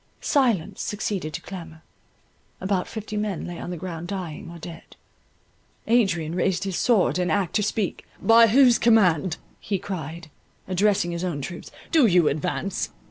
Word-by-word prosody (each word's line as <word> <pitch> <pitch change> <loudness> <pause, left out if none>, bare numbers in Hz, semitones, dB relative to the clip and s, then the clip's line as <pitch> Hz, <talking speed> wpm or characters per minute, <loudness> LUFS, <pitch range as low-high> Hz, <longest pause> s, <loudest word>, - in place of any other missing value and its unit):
Silence 240 - +1
succeeded 200 -6 -3
to - - -6
clamour; 165 -4 -9 0.8
about 190 -1 -1
fifty 215 -1 -6
men 210 -4 -2
lay 175 -1 -7
on - - -6
the 180 - -4
ground 170 0 -6
dying 180 -2 -5
or 170 - -9
dead. 165 0 -11 0.9
Adrian 185 -9 +2
raised 180 +1 0
his 195 -2 -3
sword 190 - +2
in 180 -1 0
act 185 0 0
to 215 - +3
speak: 210 -1 -2 0.2
"By 230 0 +6
whose 245 +1 +5
command," 185 -7 +3 0.2
he 200 - -2
cried, 170 -4 -6 0.4
addressing 190 -1 +2
his 170 +1 -4
own 170 -6 -2
troops, 170 +5 -7 0.2
"do 310 -7 +5
you 175 -5 +4
advance? 180 +5 -2
185 Hz, 155 wpm, -24 LUFS, 170-210 Hz, 0.9 s, By